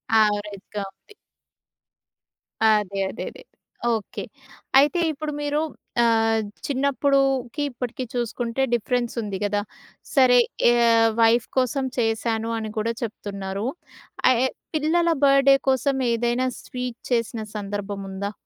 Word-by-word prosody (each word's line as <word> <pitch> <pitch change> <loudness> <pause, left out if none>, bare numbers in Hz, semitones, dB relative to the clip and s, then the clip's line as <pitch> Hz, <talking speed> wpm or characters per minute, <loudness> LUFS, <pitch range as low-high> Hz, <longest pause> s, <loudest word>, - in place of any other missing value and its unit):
యావరేజ్‌గా 205 -1 0
ఉంది. 305 - -22 1.6
అదే. 205 -2 +1
అదే. - - -6
అదే. - - -14 0.5
ఓకే. 220 -2 -4 0.6
అయితే 295 +6 +3
ఇప్పుడు 305 0 -5
మీరు 290 +1 0 0.4
ఆహ్, 225 -1 +3 0.2
చిన్నప్పుడుకి 275 -1 +1
ఇప్పటికి 250 +1 -5
చూసుకుంటే 240 +1 -2
డిఫరెన్స్ 240 +1 0
ఉంది 205 -3 -4
కదా! 205 0 0 0.5
సరే 255 -3 +6 0.3
ఆహ్, 230 -1 +4
వైఫ్ 225 +1 +4
కోసం 260 +1 +1
చేశాను 225 -1 0
అని 220 -1 -4
కూడా 220 +2 0
చెప్తున్నారు. 200 -3 -4 0.6
ఆహ్, 255 -2 +4
యె - - +3 0.3
పిల్లల 330 +3 +2
బర్త్‌డే 275 0 +6
కోసం 265 +1 +1
ఏదైనా 240 +2 +1
స్వీట్ 250 -2 -6
చేసిన 230 -1 0
సందర్భం 205 0 -4
ఉందా? 200 +1 -4
235 Hz, 110 wpm, -24 LUFS, 215-265 Hz, 1.6 s, సరే